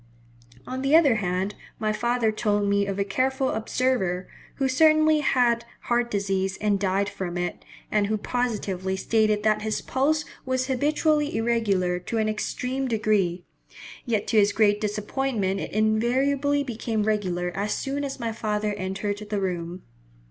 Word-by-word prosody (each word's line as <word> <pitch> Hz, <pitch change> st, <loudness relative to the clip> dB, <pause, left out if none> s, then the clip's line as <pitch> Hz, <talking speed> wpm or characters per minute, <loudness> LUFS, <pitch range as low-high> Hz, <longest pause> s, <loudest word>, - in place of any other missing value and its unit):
On 260 Hz, +1 st, -4 dB
the 275 Hz, +3 st, +3 dB
other 285 Hz, -9 st, +5 dB
hand, 190 Hz, 0 st, -1 dB, 0.2 s
my 215 Hz, -1 st, 0 dB
father 235 Hz, +1 st, +1 dB
told 205 Hz, -2 st, 0 dB
me 200 Hz, 0 st, +2 dB
of 195 Hz, -1 st, -3 dB
a 200 Hz, -, +2 dB
careful 260 Hz, +6 st, 0 dB
observer, 220 Hz, -5 st, 0 dB, 0.3 s
who 270 Hz, -, 0 dB
certainly 310 Hz, +3 st, +4 dB
had 245 Hz, -5 st, +2 dB, 0.2 s
heart 240 Hz, 0 st, 0 dB
disease 195 Hz, -2 st, -1 dB
and 205 Hz, -2 st, +1 dB
died 195 Hz, 0 st, +1 dB
from 190 Hz, -3 st, -4 dB
it, 175 Hz, 0 st, -3 dB, 0.3 s
and 210 Hz, -1 st, +2 dB
who 215 Hz, +1 st, 0 dB
positively 200 Hz, -6 st, -2 dB
stated 215 Hz, 0 st, +1 dB
that 215 Hz, -1 st, +2 dB
his 215 Hz, 0 st, -1 dB
pulse 300 Hz, +4 st, 0 dB, 0.2 s
was 260 Hz, 0 st, 0 dB
habitually 295 Hz, +3 st, +1 dB
irregular 205 Hz, -6 st, +1 dB
to 205 Hz, +6 st, -4 dB
an 220 Hz, -1 st, +1 dB
extreme 255 Hz, +5 st, -2 dB
degree; 205 Hz, -6 st, +1 dB, 0.6 s
yet 220 Hz, -4 st, -1 dB
to 220 Hz, -, +3 dB
his 205 Hz, 0 st, +3 dB
great 210 Hz, -1 st, +3 dB
disappointment 210 Hz, -1 st, -1 dB
it -, -, -5 dB
invariably 260 Hz, +7 st, +2 dB
became 225 Hz, -4 st, -2 dB
regular 185 Hz, -5 st, -1 dB
as 205 Hz, +2 st, -2 dB
soon 280 Hz, +1 st, -2 dB
as 275 Hz, -1 st, -4 dB
my 230 Hz, -2 st, -2 dB
father 210 Hz, -1 st, -1 dB
entered 200 Hz, +1 st, -3 dB
the 210 Hz, -, -1 dB
room. 180 Hz, -1 st, -3 dB
215 Hz, 155 wpm, -25 LUFS, 200-255 Hz, 0.6 s, other